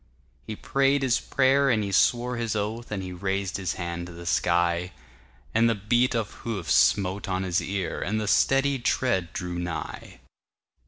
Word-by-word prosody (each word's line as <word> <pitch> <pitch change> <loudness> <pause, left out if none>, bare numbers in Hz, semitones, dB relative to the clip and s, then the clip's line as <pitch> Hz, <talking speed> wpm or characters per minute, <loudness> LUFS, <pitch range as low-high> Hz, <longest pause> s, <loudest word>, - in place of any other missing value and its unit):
He 110 - -4
prayed 135 +4 +1
his 125 -3 +2
prayer 135 +1 +2
and 110 -4 +2
he 100 - -3
swore 120 +5 +2
his 115 -2 -2
oath, 110 +3 -3
And 100 -3 -3
he 90 -1 -6
raised 95 +1 -2
his 95 -3 -2
hand 85 -1 -4
to - - -10
the 85 0 -10
sky; 85 +1 +1 0.6
But 115 +1 +4
the 115 - +2
beat 120 +5 +1
of 110 -3 -2
hoofs 100 -8 -2
smote 95 0 +2
on 95 0 -1
his 90 -1 0
ear, 95 -3 -3
And 110 +3 -1
the 105 - -3
steady 135 +5 +3
tread 105 -8 0
drew 90 -1 -4
nigh. 85 -2 -6
100 Hz, 175 wpm, -26 LUFS, 90-120 Hz, 0.6 s, But